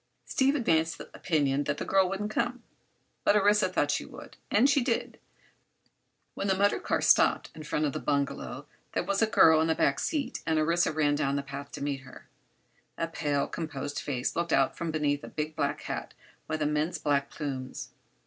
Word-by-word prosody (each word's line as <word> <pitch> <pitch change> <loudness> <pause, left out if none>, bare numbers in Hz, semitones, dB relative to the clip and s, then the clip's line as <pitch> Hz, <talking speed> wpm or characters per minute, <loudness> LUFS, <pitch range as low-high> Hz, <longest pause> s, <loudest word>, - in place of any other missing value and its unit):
Steve 275 +2 +2
advanced 165 - +1
the - - -11
opinion 145 -4 +1
that - - -1
the - - -4
girl 190 -1 +3
wouldn't 205 +2 -3
come, 245 +2 -1 0.6
but - - +4
Orissa 205 -1 +4
thought 145 -5 +1
she 145 - -1
would. - - -12
And 230 +6 +4
she 280 0 +3
did. 240 -2 -2 1.1
When 200 - -3
the 190 - +3
motor 200 +1 +3
car - - -1
stopped - - +4
in 155 - -10
front 150 0 -1
of 145 - -1
the - - -3
bungalow 140 -1 -2 0.3
there - - 0
was 195 +3 0
a 225 - +4
girl 160 -7 +6
in 160 - +2
the 160 - +2
back - - +2
seat 300 -4 -2
and 160 -1 0
Orissa 165 +2 +2
ran 150 -2 +2
down 140 -1 0
the 140 - -1
path 140 +1 -8
to - - -5
welcome 140 -1 -2
her. 130 - -13 0.7
A 165 - -1
pale, 145 -4 0
composed 145 -3 -4
face 130 -3 -2
looked 170 0 -1
out 135 -1 +3
from 170 - -3
beneath 150 -2 0
a - - -7
big 155 0 -4
black - - -1
hat - - -5 0.3
with 155 -1 -1
immense 150 +3 0
black 140 -1 0
plumes. 135 -4 -5
155 Hz, 195 wpm, -29 LUFS, 145-195 Hz, 1.1 s, girl